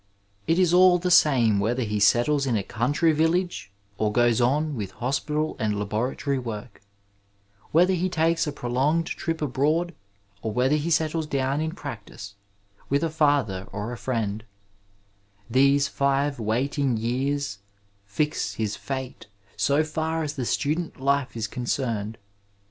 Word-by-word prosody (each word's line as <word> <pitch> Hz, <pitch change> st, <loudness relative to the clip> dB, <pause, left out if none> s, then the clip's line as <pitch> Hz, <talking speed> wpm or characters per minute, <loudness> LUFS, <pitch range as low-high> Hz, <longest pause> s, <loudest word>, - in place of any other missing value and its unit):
It 165 Hz, -, +3 dB
is 180 Hz, -2 st, +3 dB
all 180 Hz, 0 st, +7 dB
the 180 Hz, +1 st, -1 dB
same 120 Hz, -, +5 dB
whether 120 Hz, +5 st, 0 dB
he 105 Hz, -1 st, -2 dB
settles 135 Hz, +7 st, +3 dB
in 120 Hz, -4 st, +1 dB
a 100 Hz, -, -2 dB
country 145 Hz, -, +1 dB
village 160 Hz, -, 0 dB, 0.3 s
or 105 Hz, -1 st, +1 dB
goes 120 Hz, +1 st, +3 dB
on 145 Hz, +5 st, +1 dB
with 105 Hz, -5 st, -4 dB
hospital 150 Hz, +5 st, -2 dB
and 105 Hz, -2 st, 0 dB
laboratory 120 Hz, +7 st, -1 dB
work; 115 Hz, -1 st, -7 dB, 0.9 s
whether 180 Hz, +4 st, +4 dB
he 185 Hz, +1 st, 0 dB
takes 165 Hz, -1 st, +1 dB
a -, -, -1 dB
prolonged 140 Hz, +6 st, 0 dB
trip 165 Hz, -1 st, -3 dB
abroad; 155 Hz, +6 st, 0 dB, 0.5 s
or 110 Hz, -, -3 dB
whether 130 Hz, +6 st, +2 dB
he 150 Hz, +2 st, -1 dB
settles 160 Hz, -1 st, +1 dB
down 140 Hz, 0 st, 0 dB
in 160 Hz, +1 st, -2 dB
practice, 110 Hz, -, -8 dB, 0.6 s
with 140 Hz, +2 st, +1 dB
a 165 Hz, -, 0 dB
father 145 Hz, -12 st, +1 dB
or 105 Hz, +4 st, -4 dB
a -, -, -4 dB
friend 110 Hz, -4 st, -2 dB, 0.6 s
— 100 Hz, +1 st, -27 dB
^these 140 Hz, +2 st, +4 dB
five 140 Hz, 0 st, 0 dB
waiting 125 Hz, +3 st, 0 dB
years 125 Hz, -1 st, -2 dB, 0.4 s
fix 150 Hz, +10 st, -2 dB
his 110 Hz, -2 st, -2 dB
fate 130 Hz, -4 st, -6 dB, 0.3 s
so 140 Hz, +3 st, +2 dB
far 160 Hz, +1 st, -2 dB
as 150 Hz, -1 st, -3 dB
the 130 Hz, -4 st, -4 dB
student 155 Hz, +7 st, -1 dB
life 140 Hz, -2 st, 0 dB
is 110 Hz, -, -1 dB
con 125 Hz, +4 st, -6 dB
cerned. 115 Hz, -5 st, -2 dB
135 Hz, 150 wpm, -25 LUFS, 115-155 Hz, 0.9 s, all